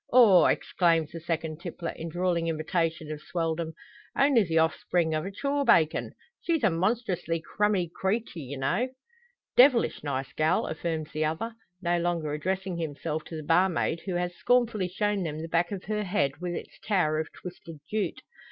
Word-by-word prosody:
"Aw!" 225 -8 +7
exclaims 165 -4 +2
the 165 - -6
second 160 -1 -3
tippler, 170 -1 -5
in 165 - -6
drawling 175 0 0
imitation 160 0 -1
of 150 -1 -6
Swelldom, 165 -1 -2 0.4
"only 275 -5 +5
the 165 -3 0
offspring 160 +1 +2
of 155 +3 -1
a - - -5
chaw 280 +7 -1
bacon! 160 - +3 0.3
she's 325 -5 0
a 215 - +5
monstrously 180 -2 0
crummy 205 +1 0
creetya, 175 - -3
anyhow." 135 - +1 0.7
"Devilish 250 - +5
nice 135 0 -3
gal!" 155 +4 +2
affirms 160 -1 -3
the 155 0 0
other, 165 +10 -2 0.3
no 175 0 +2
longer 170 -3 -1
addressing 185 +3 -2
himself 155 0 -3
to 165 - -8
the 155 - -5
barmaid, 170 +1 +2
who 185 - -1
has 175 0 -1
scornfully 230 -4 +2
shown 205 +2 0
them 155 -3 -3
the 165 - -5
back 170 +2 +1
of 195 -2 -4
her 210 0 -2
head, 180 -8 +1
with 175 -1 -2
its - - -8
tower 165 -7 +1
of 155 - -4
twisted 175 -3 -10
jute. 215 -1 -2
170 Hz, 170 wpm, -28 LUFS, 160-195 Hz, 0.7 s, Aw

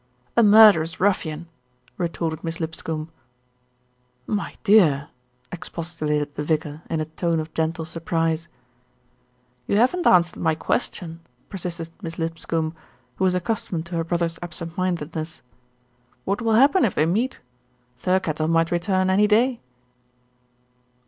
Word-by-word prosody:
"A 235 - +6
murderous 205 -7 +6
ruffian," 170 -4 0 0.5
retorted 165 -2 -2
Miss 165 -1 -4
Lipscombe. 160 -1 -4 1.1
"My 205 +3 -3
dear!" 160 -10 +4 0.4
expostulated 160 -4 -3
the - - -4
vicar 150 0 -2
in 165 - -1
a - - -1
tone 165 +1 -1
of 155 0 -6
gentle 160 0 -1
surprise. 165 0 -1 1.2
"You 200 - +2
haven't 295 +10 +3
answered 175 -1 +4
my 160 -2 +2
question," 165 -2 -2 0.3
persisted 170 -4 -5
Miss 165 -3 -6
Lipscombe, 165 -1 -2 0.4
who 190 - +1
was 180 -1 +2
accustomed 180 -3 -2
to 170 0 -6
her 165 - 0
brother's 170 0 -1
ab 175 -2 -7
sent 170 0 -6
mindedness. 165 -3 -3 0.8
"What 200 +4 -1
will 225 -1 +1
happen 280 - +5
if 215 - +1
they 155 - +3
meet? 220 +10 0 0.6
Thirkettle 160 -2 0
might 165 0 +2
return 185 +2 +1
any 205 +2 +4
day." 235 +4 +2
170 Hz, 130 wpm, -23 LUFS, 160-190 Hz, 1.2 s, A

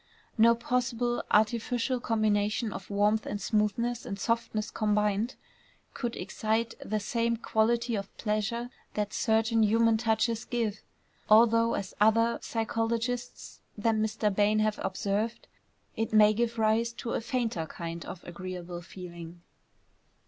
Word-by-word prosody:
No 230 +1 +6
possible 240 0 -1
artificial 235 +4 +1
combination 215 -1 0
of - - -8
warmth 210 +2 +2
and 205 - -3
smoothness 225 +3 0
and 195 - -5
softness 230 -1 -1
combined 210 +2 0 0.6
could 240 -2 -3
excite 220 +4 -1
the 215 +1 -1
same 230 +2 0
quality 235 +1 +1
of 200 -2 -3
pleasure 220 +3 -2 0.2
that 210 -1 -2
certain 225 0 +2
human 225 +1 +4
touches 225 0 +1
give, 225 -4 -2 0.5
although, 230 +1 +5
as 195 - -4
other 230 +2 +4
psychologists 230 +2 -3 0.2
than 220 +1 +1
Mr. 215 -1 0
Bain 210 +1 +3
have 215 -1 +1
observed, 205 +4 -2 0.5
it 225 0 -2
may 215 0 +7
give 235 +1 -1
rise 225 +1 +2
to 235 - -5
a - - -1
fainter 230 - -2
kind 170 0 -6
of 175 - -8
agreeable 175 0 -7
feeling. 170 -1 -10
220 Hz, 125 wpm, -29 LUFS, 210-235 Hz, 0.6 s, may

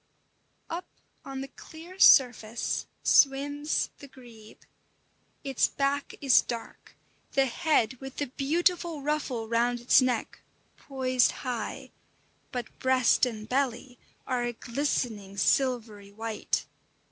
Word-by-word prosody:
Up 340 +2 -5 0.4
on 270 -1 -6
the 270 - -5
clear 330 +6 -13
surface 240 - +4 0.2
swims 285 +2 +2
the 280 - -11
grebe. 235 -5 -15 0.8
Its 270 -3 +1
back 280 0 -2
is 270 -3 +6
dark, 230 -1 -8 0.4
the 270 - +3
head, 260 -2 0
with 270 0 -8
the 290 - -1
beautiful 325 +3 0
ruffle 280 -6 -2
round 240 +1 +1
its 240 +2 +5
neck, 250 -3 -2 0.3
poised 255 -2 +1 0.2
high; 240 -4 -4 0.6
but 245 -3 -6
breast 260 -1 +3
and 215 -3 -7
belly 250 -1 -2 0.3
are 255 -2 -1
a 240 0 -2
glistening 230 -6 -3
slivery 220 -5 0
white. 220 +1 -3
255 Hz, 110 wpm, -28 LUFS, 235-280 Hz, 0.8 s, is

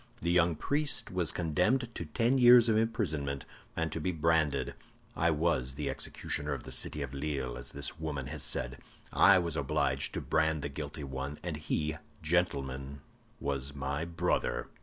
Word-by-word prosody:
The 85 - +2
young 85 -1 +4
priest 145 - 0
was 90 -3 +1
condemned 90 - +1
to 85 - -5
ten 115 - +2
years 120 -1 +8
of 110 - +3
imprisonment, 80 - 0 0.3
and 80 -1 -1
to 80 - -3
be 90 - 0
branded. 80 -5 +1 0.4
I 85 +2 +2
was 75 -5 +1
executioner 75 0 -3
of 70 - -5
the - - -8
city 75 - 0
of 70 -1 -6
Lille, 70 -3 -2
as - - -6
this 70 +3 -2
woman 75 -4 -3
has 75 +1 -6
said. 65 +2 -2 0.3
I 95 -1 +7
was 85 -4 -1
obliged - - 0
to - - 0
brand 80 -2 +1
the 70 - -2
guilty 70 +1 -6
one; 70 +2 -4
and 85 -3 -3
he, 75 0 -1 0.3
gentlemen, 70 -5 -1 0.4
was 70 0 -3
my 70 +2 -2
brother! 85 0 -1
75 Hz, 165 wpm, -31 LUFS, 70-85 Hz, 0.4 s, years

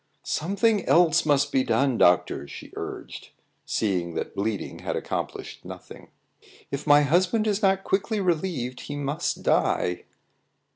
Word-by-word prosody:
"Something 200 +5 +1
else 165 -2 +4
must 145 -1 +3
be 130 - +2
done, 120 +2 +1
doctor," 90 -4 +3
she - - -10
urged, - - -7 0.4
seeing 90 -5 -1
that - - -4
bleeding 105 0 -3
had - - -3
accomplished - - -5
nothing. - - -11 0.6
"If 140 +2 -4
my 145 0 +7
husband 180 - +2
is 210 -1 0
not 195 -1 +2
quickly 205 +3 0
relieved, 160 -9 -1
he 145 - -6
must 145 +2 -2
die." 90 0 +1
145 Hz, 135 wpm, -25 LUFS, 125-190 Hz, 0.6 s, my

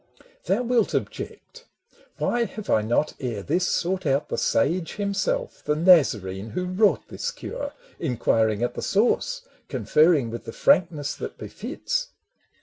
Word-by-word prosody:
Thou 250 - +1
wilt 235 -3 +1
object 485 0 -5 0.3
— - - -30
Why 240 -1 +1
have 215 -2 -6
I 110 - +4
not 120 +8 0
ere 115 -7 -3
this 175 - +1
Sought 185 -1 0
out 140 +2 +1
the - - -2
sage 165 +4 +1
himself, 350 - -2
the 150 - +1
Nazarene 115 - +3
Who 180 +12 -3
wrought 195 +3 +2
this 480 - -3
cure, 285 -11 -6 0.3
inquiring 115 -6 +1
at 120 - 0
the - - -5
source, 245 - +1 0.3
Conferring 150 -7 +3
with 115 - -7
the - - -7
frankness 170 - +2
that - - -6
befits? - - -3
175 Hz, 145 wpm, -25 LUFS, -, 0.3 s, I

